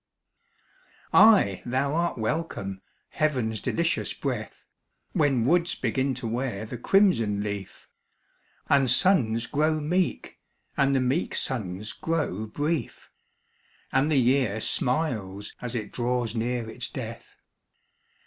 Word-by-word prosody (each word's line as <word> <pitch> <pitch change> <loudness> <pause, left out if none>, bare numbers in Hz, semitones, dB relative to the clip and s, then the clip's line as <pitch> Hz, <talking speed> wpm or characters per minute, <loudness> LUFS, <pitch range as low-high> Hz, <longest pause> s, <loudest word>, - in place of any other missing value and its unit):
Ay, 200 - +6
thou 135 +3 0
art 170 -1 0
welcome, 110 - -3 0.3
heaven's 125 -8 -1
delicious 170 0 0
breath, - - -4 0.5
When 145 - +2
woods 170 +4 +2
begin 130 +2 -1
to 125 -1 -5
wear 115 -3 -2
the 120 +2 -7
crimson 115 - +3
leaf, 100 -2 -6 0.8
And 140 -3 +4
suns 120 - +3
grow 155 +3 +1
meek, 175 +4 -1 0.4
and 140 0 +2
the 130 - +2
meek 130 +8 0
suns 105 - -3
grow 110 - -2
brief, 150 +7 -3 0.8
And 135 +4 +2
the 150 - +3
year 125 -4 +2
smiles 110 -8 -1
as 125 0 -4
it 110 -3 -4
draws 120 -2 -1
near 120 0 -2
its 110 - -5
death. - - -8
125 Hz, 115 wpm, -26 LUFS, 110-155 Hz, 0.8 s, Ay